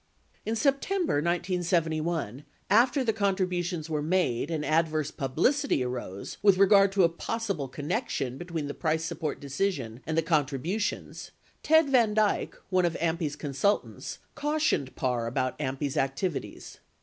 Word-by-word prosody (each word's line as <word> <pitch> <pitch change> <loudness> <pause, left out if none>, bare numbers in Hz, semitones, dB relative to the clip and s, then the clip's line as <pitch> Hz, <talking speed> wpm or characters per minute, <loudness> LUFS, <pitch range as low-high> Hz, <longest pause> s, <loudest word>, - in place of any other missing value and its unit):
33 - - 0
In 225 - 0
September 300 - +1
1971, 165 - -1 0.3
after 250 +6 +4
the 225 -3 +1
contributions 180 -5 -1
were 155 -2 -1
made 155 -5 0
and 155 -2 -2
adverse 155 -1 +1
publicity 160 - +1
arose 120 -6 -5
with 200 -2 +5
regard 195 0 +6
to 195 -1 +3
a - - +7
possible 190 -2 -3
connection 145 - -3
between 170 -3 -4
the 145 - -4
price 160 0 -1
support 160 -2 -3
decision 140 - -2
and 160 0 -1
the 165 - +3
contributions, 155 - -1 0.3
Ted 320 0 +5
Van 230 -5 +4
Dyk, 215 -1 +1 0.2
one 185 -1 +3
of 170 - 0
AMPI's 160 -3 -1
consultants, 150 +8 -1 0.2
cautioned 295 - 0
Parr 125 -3 -1
about 130 +2 -2
AMPI's 135 0 -2
activities. 135 +5 -3
165 Hz, 135 wpm, -28 LUFS, 145-200 Hz, 0.3 s, a